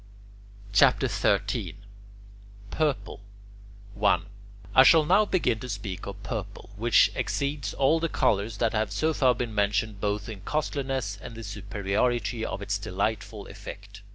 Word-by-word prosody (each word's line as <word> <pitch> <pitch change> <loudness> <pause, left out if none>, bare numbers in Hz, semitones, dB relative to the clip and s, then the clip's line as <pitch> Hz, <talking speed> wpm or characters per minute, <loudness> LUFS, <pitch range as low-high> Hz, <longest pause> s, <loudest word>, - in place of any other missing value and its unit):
CHAPTER 100 - +5
XIII - - 0 1.0
PURPLE 145 -10 -1 0.7
1. 105 +1 +2 0.5
I 130 - +8
shall 155 +3 +6
now 195 +6 +4
begin 125 - +1
to 125 - -7
speak 100 -4 -5
of - - -8
purple, - - -6
which 115 +2 +4
exceeds 140 +1 -2
all 140 +4 +3
the 165 0 -1
colours 105 -3 +1
that 115 +1 +1
have 110 -2 0
so 155 +11 +1
far 130 -4 +3
been 120 -2 -3
mentioned 105 0 0
both 105 0 -1
in 105 -4 -7
costliness 135 -5 -2
and 115 - -8
in - - -12
the 115 - -8
superiority 105 +3 -1
of 100 -2 -4
its 100 0 -1
delightful 100 +3 -3
effect. 100 0 -10
110 Hz, 145 wpm, -27 LUFS, 100-135 Hz, 1.0 s, I